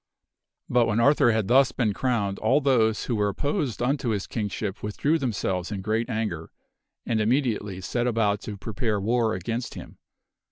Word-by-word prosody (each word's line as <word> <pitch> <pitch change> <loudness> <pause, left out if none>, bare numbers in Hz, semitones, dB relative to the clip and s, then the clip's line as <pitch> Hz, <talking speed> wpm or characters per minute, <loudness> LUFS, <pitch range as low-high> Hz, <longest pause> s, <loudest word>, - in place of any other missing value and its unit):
But 120 -1 +3
when 110 0 +1
Arthur 140 -1 +5
had 110 -3 0
thus 130 +1 +5
been 115 -5 0
crowned, 105 -5 -1
all 130 +7 +3
those 115 -6 +2
who 120 - -1
were 105 -1 +1
opposed 140 - -2
unto 135 -1 0
his 105 -3 -1
Kingship 105 -2 -4
withdrew 140 +10 0
themselves 95 - -2
in 100 -2 -4
great 110 +4 -1
anger, 110 -8 -3 0.6
and 110 -2 0
immediately 110 -5 0
set 120 +6 -1
about 110 -3 +1
to 105 -2 -6
prepare 110 +1 -2
war 115 +1 +1
against 115 +6 -4
him. - - -10
110 Hz, 165 wpm, -25 LUFS, 105-125 Hz, 0.6 s, Arthur